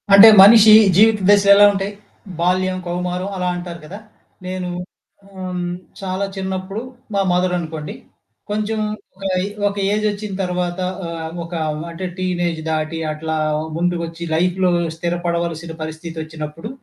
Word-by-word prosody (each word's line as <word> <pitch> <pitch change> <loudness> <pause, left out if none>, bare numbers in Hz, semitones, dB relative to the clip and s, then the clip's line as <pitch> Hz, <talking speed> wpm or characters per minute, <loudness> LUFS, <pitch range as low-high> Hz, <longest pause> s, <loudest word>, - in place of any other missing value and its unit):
అంటే 200 +3 +11 0.2
మనిషి 215 +1 +8 0.2
జీవిత 215 +2 +5
దశలెలా 200 0 +7
ఉంటాయి! 195 +1 -3 0.5
బాల్యం, 185 +2 +1
కౌమారం 180 +2 -3
అలా 180 -1 -2
అంటారు 175 -1 -7
గదా! 190 +7 -9 0.5
నేను 185 -1 -4 0.7
ఆహ్, 185 -1 -4 0.4
చాలా 190 +1 -2
చిన్నప్పుడు 190 +2 -4 0.3
మా 200 - +2
మదరనుకోండి. 175 -4 -2 0.5
కొంచెం 215 +1 -2 0.4
ఒక 195 - -14 0.2
ఏ - - -1 0.2
ఒక 200 - -3 0.2
ఏజొచ్చిన 210 -1 -2
తర్వాత 180 0 -2 0.3
ఆహ్, 165 -1 -5
ఒక 170 +1 -10 0.4
అంటే 170 +3 -6
టీనేజ్ 175 -3 -1
దాటి 155 +1 -2
అట్లా 160 +1 -4 0.4
ముందుకొచ్చి 170 -1 -2
లైఫ్‌లో 180 +2 +1 0.2
స్థిరపడవలసిన 170 -1 -3
పరిస్థతి 160 +1 -7
ఒచ్చినప్పుడు, 155 +4 -7
180 Hz, 120 wpm, -19 LUFS, 170-195 Hz, 0.7 s, అంటే